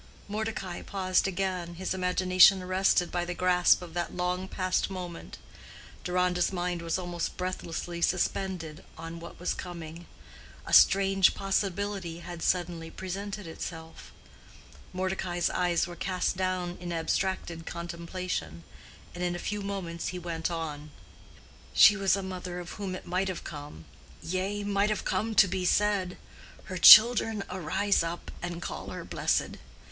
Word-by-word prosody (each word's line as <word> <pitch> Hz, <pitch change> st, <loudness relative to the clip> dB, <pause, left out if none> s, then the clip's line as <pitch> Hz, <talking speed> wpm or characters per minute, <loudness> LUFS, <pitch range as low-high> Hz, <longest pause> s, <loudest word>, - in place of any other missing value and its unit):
'" -, -, -24 dB
Mordecai 210 Hz, -3 st, -4 dB
paused 185 Hz, -1 st, 0 dB
again, 185 Hz, -2 st, -3 dB
his 185 Hz, +2 st, -3 dB
imagination 185 Hz, 0 st, +5 dB
arrested 185 Hz, -1 st, +2 dB
by 175 Hz, -, -1 dB
the 175 Hz, 0 st, -4 dB
grasp 180 Hz, 0 st, +3 dB
of 170 Hz, -2 st, -10 dB
that 175 Hz, 0 st, -3 dB
long 180 Hz, +1 st, -1 dB
passed 185 Hz, 0 st, -1 dB
moment. 180 Hz, -3 st, -7 dB, 0.7 s
Deronda's 180 Hz, 0 st, +1 dB
mind 175 Hz, -2 st, -2 dB
was 165 Hz, 0 st, -1 dB
almost 175 Hz, -2 st, -4 dB
breathlessly 175 Hz, -2 st, -4 dB
suspended 175 Hz, -3 st, -1 dB
on 165 Hz, +1 st, -7 dB
what 170 Hz, -, -11 dB
was 180 Hz, -, -1 dB
coming. 170 Hz, -2 st, -8 dB, 0.6 s
A -, -, -6 dB
strange 195 Hz, -1 st, +6 dB
possibility 195 Hz, -3 st, -2 dB
had 175 Hz, -1 st, -8 dB
suddenly 170 Hz, -2 st, -1 dB
presented 195 Hz, +3 st, -6 dB
itself. 160 Hz, 0 st, -8 dB, 0.8 s
Mordecai's 185 Hz, -1 st, -1 dB
eyes 175 Hz, -2 st, +1 dB
were 175 Hz, 0 st, -8 dB
cast 185 Hz, 0 st, -1 dB
down 185 Hz, -1 st, -2 dB
in 175 Hz, -1 st, -6 dB
abstracted 170 Hz, 0 st, -2 dB
contemplation, 170 Hz, -, -5 dB, 0.5 s
and 175 Hz, -, -5 dB
in 175 Hz, 0 st, 0 dB
a 175 Hz, -, -6 dB
few 210 Hz, 0 st, -2 dB
moments 190 Hz, -4 st, -4 dB
he 180 Hz, -, -4 dB
went 170 Hz, -2 st, -3 dB
on, 155 Hz, -3 st, -5 dB, 0.9 s
"She 210 Hz, -, +8 dB
was 195 Hz, -2 st, +2 dB
a 195 Hz, -, -4 dB
mother 180 Hz, -1 st, -5 dB
of 175 Hz, -1 st, -8 dB
whom 195 Hz, -3 st, -5 dB
it -, -, -9 dB
might 185 Hz, +2 st, -1 dB
have 185 Hz, -2 st, -4 dB
come—yea, 145 Hz, -, -6 dB
might 200 Hz, 0 st, +1 dB
have 215 Hz, -, -2 dB
come 220 Hz, 0 st, -1 dB
to 200 Hz, -, +7 dB
be 185 Hz, 0 st, -2 dB
said, 195 Hz, -1 st, +1 dB, 0.5 s
'Her 185 Hz, -, -6 dB
children 220 Hz, +1 st, +8 dB
arise 185 Hz, +3 st, +1 dB
up 170 Hz, +1 st, -5 dB
and 175 Hz, 0 st, -5 dB
call -, -, -6 dB
her -, -, -7 dB
blessed. -, -, -1 dB
180 Hz, 145 wpm, -29 LUFS, 170-190 Hz, 0.9 s, She